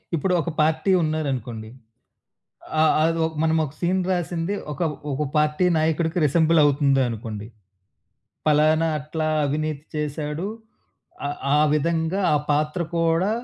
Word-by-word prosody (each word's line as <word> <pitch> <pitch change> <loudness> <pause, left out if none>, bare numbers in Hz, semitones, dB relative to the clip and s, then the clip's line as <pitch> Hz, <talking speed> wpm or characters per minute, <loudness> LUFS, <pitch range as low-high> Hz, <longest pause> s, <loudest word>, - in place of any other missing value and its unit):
ఇప్పుడు 180 +4 0
ఒక 170 - -4
పార్టీ 160 +5 +2
ఉన్నారనుకోండి. 130 -8 -3 1.1
ఆ - - +6 0.2
ఆదొ 165 0 +1 0.2
మనమోక 160 -3 +1
సీన్ 180 +2 +1
రాసింది 175 +1 -2 0.2
ఒక 140 - -12 0.3
ఒక 140 +2 -1
పార్టీ 150 +4 +2
నాయకుడికి 160 +2 0
రిసెంబులవుతుంది 145 -3 +3
అనుకోండి. 110 -2 -6 1.0
పలానా 155 +2 +3
అట్లా 155 +2 -3 0.2
అవినీతి 150 +1 -2
చేసాడు, 150 +3 -3 0.8
ఆ - - -1 0.3
ఆ - - +4 0.2
విధంగా, 165 +4 0
ఆ - - +4
పాత్ర 150 +3 0 0.2
కూడా 165 +4 +2
155 Hz, 110 wpm, -23 LUFS, 145-165 Hz, 1.1 s, ఆ